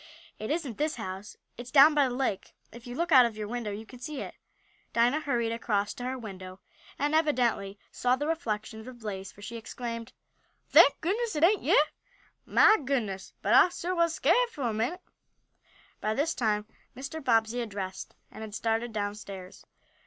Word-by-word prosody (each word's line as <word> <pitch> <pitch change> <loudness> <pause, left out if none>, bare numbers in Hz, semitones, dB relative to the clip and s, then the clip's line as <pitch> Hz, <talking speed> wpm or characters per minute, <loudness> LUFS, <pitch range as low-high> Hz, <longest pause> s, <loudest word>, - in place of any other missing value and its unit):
"It 215 - -5
isn't 290 -8 -2
this 300 +1 0
house. 195 -3 -7 0.2
It's 245 +1 -8
down 290 +3 +7
by 290 -2 +4
the 245 - -4
lake. 250 -7 -2 0.2
If 235 +1 -12
you 245 - -6
look 340 +4 -1
out 255 -4 +8
of 220 -2 -9
your 210 -1 -4
window 235 -1 -3
you 210 +2 -6
can 250 +2 -13
see 290 +2 -6
it." - - -6 0.6
Dinah 240 +6 +3
hurried 240 -6 -1
across 210 -3 -1
to 245 - -7
her 260 +1 -2
window, 190 -5 -9 0.4
and 290 +2 0
evidently 245 -10 +1
saw 250 0 +1
the 290 - -3
reflection 220 -8 -3
of 220 - -11
the 255 - -8
blaze, 195 -4 -6
for 205 - -15
she 230 +3 -6
exclaimed: 230 0 -6 0.6
"Thank - - +7
goodness 430 +5 -1
it 300 - 0
ain't 395 +4 +5
yeah! 295 - +5 0.6
Mah 435 - +6
goodness, 235 -9 -3
but - - +2
I - - +7
suah 350 +1 -3
was 335 -2 +2
skarit - - +3
fo' 290 - -7
a 235 -3 0
minute!" 245 +12 -2 1.0
By 215 0 -1
this 300 +5 +1
time 210 -3 0 0.3
Mr. 275 +4 -6
Bobbsey 230 -1 +2
had 235 -2 -3
dressed, 190 -2 -6 0.2
and 220 - -10
had 215 -1 -7
started 225 +1 -1
downstairs. 205 -3 -6
235 Hz, 190 wpm, -29 LUFS, 215-290 Hz, 1.0 s, out